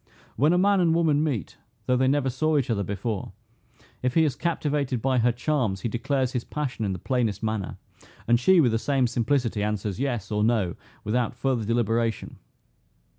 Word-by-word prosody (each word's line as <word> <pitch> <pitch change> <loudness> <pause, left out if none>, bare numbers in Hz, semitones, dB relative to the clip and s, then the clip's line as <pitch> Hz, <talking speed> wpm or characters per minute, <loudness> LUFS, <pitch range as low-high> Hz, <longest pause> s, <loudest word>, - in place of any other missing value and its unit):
When 145 +7 +3
a 180 - +3
man 200 +1 +3
and 175 -2 +3
a - - +3
woman 155 -3 +2
meet, 125 - -3 0.3
though 125 - +2
they 130 +1 +2
never 135 -1 +1
saw 155 +4 +1
each 130 -4 0
other 105 -3 0
before, 100 +2 -4 0.7
if 125 0 -1
he 160 - +5
is 150 -4 +1
captivated 145 -6 -1
by 130 +2 +1
her 120 +1 +3
charms, 120 -6 -1
he 115 - -2
declares 130 +2 -1
his 125 -2 -2
passion 130 -7 -3
in 100 - -1
the - - -4
plainest 115 +1 -1
manner; 110 -3 -2 0.5
and 120 0 +4
she, 185 +8 +5
with 130 -7 +4
the 115 - +1
same 135 0 +1
simplicity, 120 -1 0
answers, 105 -2 -2
Yes, 120 -7 -2
or 105 0 +1
No, 110 -6 +1 0.3
without 120 +2 -1
further 120 -2 -1
deliberation. 115 -1 -1
125 Hz, 190 wpm, -25 LUFS, 110-140 Hz, 0.7 s, he